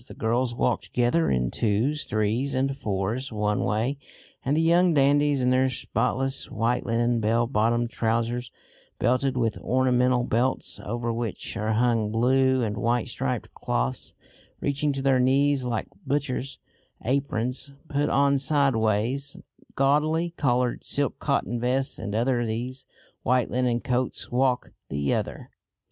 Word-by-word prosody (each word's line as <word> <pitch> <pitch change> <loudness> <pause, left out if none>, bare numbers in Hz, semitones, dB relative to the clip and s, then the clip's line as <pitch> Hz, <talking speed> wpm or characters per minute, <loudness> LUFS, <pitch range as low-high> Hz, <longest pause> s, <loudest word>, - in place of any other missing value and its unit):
The - - -11
girls 120 +2 0
walk - - +1
together 125 +7 +1
in 60 -1 0
twos, 120 +8 0
threes 110 +6 0
and 135 +1 0
fours 110 +3 -2
one 105 -1 0
way, 115 +8 -1 0.4
and 140 +3 +1
the - - +3
young 170 +1 +4
dandies, 145 0 +3
in 125 0 +2
their 130 +1 +3
spotless 135 +2 -1
white 115 +3 -1
linen 120 +1 +1
bell 115 +2 +2
bottomed 120 0 +1
trousers, 115 +1 -1 0.5
belted 130 +2 +1
with 115 -3 0
ornamental 125 -1 +2
belts, 120 +3 0
over 120 +1 -2
which 115 -3 -4
are 110 +1 -1
hung 115 -2 +2
blue 130 +3 +3
and 105 -1 -2
white 120 +1 0
striped - - -3
cloths 60 +2 -2 0.4
reaching 140 +1 0
to 135 -1 -4
their 135 -2 +3
knees 135 +1 +3
like 120 -3 -1 0.2
butchers' 140 -1 -2 0.5
aprons 130 +1 -2
put 145 0 0
on 140 0 +3
sideways, 135 -1 +1 0.4
gaudily 155 +5 +2
coloured 125 -6 0
silk - - -1
cotton 120 +4 -1
vests 130 +3 0
and 105 -1 -4
over 120 +1 +1
these 125 +4 -4 0.4
white 125 0 +1
linen 125 -1 +1
coats, 125 0 -2
walk 125 0 +1 0.2
the 70 0 0
other. - - -4
125 Hz, 140 wpm, -26 LUFS, 115-135 Hz, 0.5 s, young